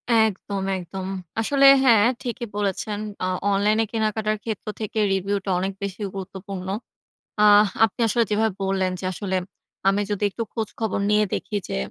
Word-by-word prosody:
একদম, 205 -3 +1
একদম। 185 +1 -6 0.3
আসলে 275 +5 +3 0.2
হ্যাঁ, 225 -5 +6 0.2
ঠিকই 240 -2 -4
বলেছেন। 205 +1 -2 0.2
আ - - +1 0.3
অনলাইনে 210 +3 +3
কেনাকাটার 215 -1 0
ক্ষেত্র 220 -3 -5
থেকে 220 0 -3
রিভিউটা 195 +1 -1
অনেক 190 +2 -2
বেশি 200 +1 -5
গুরুত্বপূর্ণ। 190 0 -6 0.8
আহ 210 0 +7 0.2
আপনি 225 - -9
আসলে 235 +2 +2
যেভাবে 220 0 +2
বললেন 190 -1 0
যে, - - -5
আসলে 190 0 -3 0.5
আমি 200 +1 +1
যদি 205 0 -2
একটু 230 +4 -4
খোঁজ 225 -3 -2
খবর 220 -4 -1
নিয়ে 210 0 +4
দেখি 210 - -2
যে - - -3
205 Hz, 150 wpm, -23 LUFS, 195-220 Hz, 0.8 s, আহ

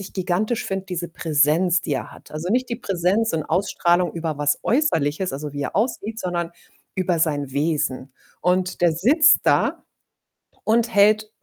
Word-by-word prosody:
ich 195 - -9
gigantisch 190 +5 -1
finde, 195 0 -4
diese 175 -2 -4
Präsenz, 165 +3 +2
die 165 -5 -4
er - - -3
hat. - - -16
Also, 160 +4 -4
nicht 250 +3 +1
die 235 - -2
Präsenz 195 +4 0
und 155 -2 -1
Ausstrahlung 180 -2 +1
über 165 -3 -3
was 145 0 +1
Äußerliches, 190 - +1
also, 145 +1 -5
wie 145 0 -4
er - - -4
aussieht, 220 0 -1
sondern 175 -4 -3 0.5
über 180 -3 0
sein 145 -4 -1
Wesen, 140 -3 -1 0.3
und 180 0 0
der 175 -1 +4
sitzt 275 - +4
da - - +1 0.8
und 230 +1 +2
hält 215 +1 +4
180 Hz, 165 wpm, -22 LUFS, 155-205 Hz, 0.8 s, der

